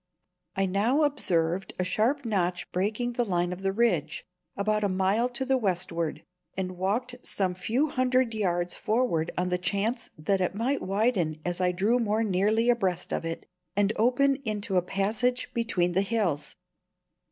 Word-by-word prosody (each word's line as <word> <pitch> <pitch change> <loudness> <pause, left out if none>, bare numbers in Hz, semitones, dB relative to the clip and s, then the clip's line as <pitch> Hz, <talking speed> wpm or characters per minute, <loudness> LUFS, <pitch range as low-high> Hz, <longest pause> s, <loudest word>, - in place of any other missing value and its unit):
I 195 - +2
now 215 +11 +2
observed 180 - +1
a 185 - 0
sharp 225 +9 +1
notch 180 -5 -1
breaking 215 +6 -1
the 240 - +1
line 175 -4 0
of 180 - -8
the 195 0 +1
ridge, 235 +4 0 0.3
about 210 +1 +1
a 205 - +2
mile 195 +6 +1
to 250 +2 -3
the 265 0 +2
westward, 175 -5 -1 0.3
and 185 -1 -3
walked 210 +8 -1
some 190 -6 -1
few 230 +11 0
hundred 255 -2 +1
yards 180 -4 0
forward 215 -8 0
on 180 +1 0
the 180 0 0
chance 200 +6 -1
that 190 +5 0
it 180 +1 0
might 250 +6 0
widen 195 -6 0
as 175 +1 -2
I 180 0 +3
drew 205 +7 +2
more 220 -1 +1
nearly 215 +3 +2
abreast 190 -7 -1
of - - -2
it, 165 0 -4 0.3
and 205 +1 +2
open 260 +4 +3
into 215 -6 -3
a 180 - +5
passage 215 +7 -1
between 200 -7 0
the 185 +2 +2
hills. 195 -8 -1
200 Hz, 165 wpm, -27 LUFS, 180-235 Hz, 0.3 s, a